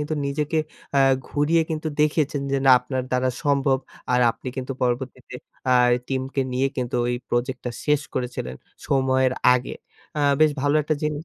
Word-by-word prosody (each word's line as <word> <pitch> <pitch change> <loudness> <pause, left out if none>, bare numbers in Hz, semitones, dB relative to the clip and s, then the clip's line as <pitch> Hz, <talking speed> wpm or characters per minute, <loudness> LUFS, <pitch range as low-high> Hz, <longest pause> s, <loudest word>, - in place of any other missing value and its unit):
কিন্তু 150 +1 -2
নিজেকে 150 +3 -1 0.4
আ - - +5 0.3
ঘুরিয়ে 160 +3 +2
কিন্তু 155 0 -2
দেখিয়েছেন 150 -2 +1
যে - - +3
না - - +8
আপনার 130 0 -3
দ্বারা 125 0 +1
সম্ভব। 140 -2 +2 0.3
আর 125 - +3
আপনি 130 - -8
কিন্তু 130 +1 -3
পরবর্তীতে 125 +1 -2 0.3
আই 125 -1 +5 0.2
টিমকে 135 +1 -2
নিয়ে 130 +2 +1
কিন্তু 125 -1 -2
ওই 125 - 0
প্রজেক্টটা 125 0 -2
শেষ 150 -1 +2
করেছিলেন 120 - -4 0.3
সময়ের 130 -1 +2 0.2
আগে। 125 +1 -2 0.4
আ - - -1 0.2
বেশ 155 - +6
ভালো 145 +1 +2
একটা 155 +1 0
জিনিস। 150 +1 -2
130 Hz, 160 wpm, -23 LUFS, 125-145 Hz, 0.4 s, না